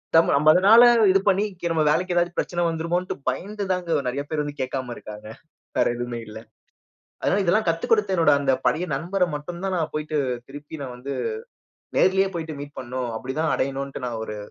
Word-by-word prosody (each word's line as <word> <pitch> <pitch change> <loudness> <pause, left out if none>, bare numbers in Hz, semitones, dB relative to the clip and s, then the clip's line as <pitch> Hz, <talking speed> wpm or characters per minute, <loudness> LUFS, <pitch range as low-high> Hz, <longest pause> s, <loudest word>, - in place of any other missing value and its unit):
தம் 165 - +5
நம்ம 150 +2 +4
அதுனால 205 +7 +7 0.3
இது 195 - +4
பண்ணி, 195 +1 +3 0.2
கி - - -7
நம்ம 160 -1 +1
வேலைக்கு 180 +3 0
ஏதாவது 175 0 +2
பிரச்சனை 175 -1 -1
வந்துருமோன்டு 170 +2 -2
பயந்து 200 +10 -4
தாங்க, 175 -3 0
நிறைய 130 +3 -1
பேரு 155 -1 -1
வந்து 145 0 -7
கேட்காம 130 -1 -3
இருக்காங்க. 105 0 -10 0.5
வேற - - +4
எதுவுமே 120 -1 -4
இல்ல. 105 0 -9 0.9
அதனால, 200 - +2
இதெல்லாம் 190 +2 +2
கத்துக் 165 +9 -1
கொடுத்த 205 -3 +3
என்னோட 165 - +4
அந்த 135 -1 +2
பழைய 175 +4 +1
நண்பர 180 +5 0
மட்டும் 170 +4 -7
தான் 190 -1 -1
நான் 160 -2 -2
போயிட்டு, 150 0 -2 0.3
திருப்பி 145 +2 -9
நான் 130 -2 -6
வந்து 135 +3 -6 0.9
நேர்லயே 190 +1 +4
போயிட்டு 160 -2 -4
மீட் 145 0 -9
பண்ணும். 125 -1 -4
அப்பிடிதான் 140 +7 -2
அடையணுன்ட்டு 135 0 -3
நான் 115 -2 -4
ஒரு 105 - -6
160 Hz, 180 wpm, -24 LUFS, 135-180 Hz, 0.9 s, அதுனால